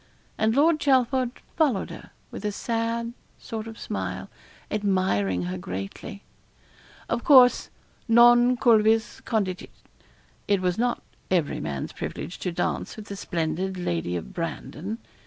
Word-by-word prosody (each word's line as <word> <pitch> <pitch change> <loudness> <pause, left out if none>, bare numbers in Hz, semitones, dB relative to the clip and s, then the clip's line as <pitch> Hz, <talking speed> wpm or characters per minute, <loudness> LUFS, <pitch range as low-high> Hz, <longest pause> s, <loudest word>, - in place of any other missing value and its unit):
And 220 +1 +1
Lord 310 +3 +4
Chelford 260 -2 +2 0.3
followed 275 - +1
her, - - -10 0.2
with - - -7
a 210 - 0
sad 230 +2 -2 0.2
sort 220 -1 -6
of 225 0 -9
smile, - - -4 0.4
admiring 185 - +1
her 90 +1 -4
greatly. 95 - -6 0.8
Of 235 - -1
course, 255 -4 +6 0.4
non 240 +2 +6
cuivis 225 -2 +3
contigit, 195 -5 -1 0.8
it 200 -2 +3
was 180 +1 0
not 245 0 0 0.3
every 175 -5 +1
man's 70 -2 -4
privilege 175 - -6
to 180 - -2
dance 170 - -2
with 215 - -9
the 200 - -5
splendid 175 +1 -2
Lady 85 - -2
of 85 - -6
Brandon. 175 +4 -4
210 Hz, 130 wpm, -26 LUFS, 175-235 Hz, 0.8 s, course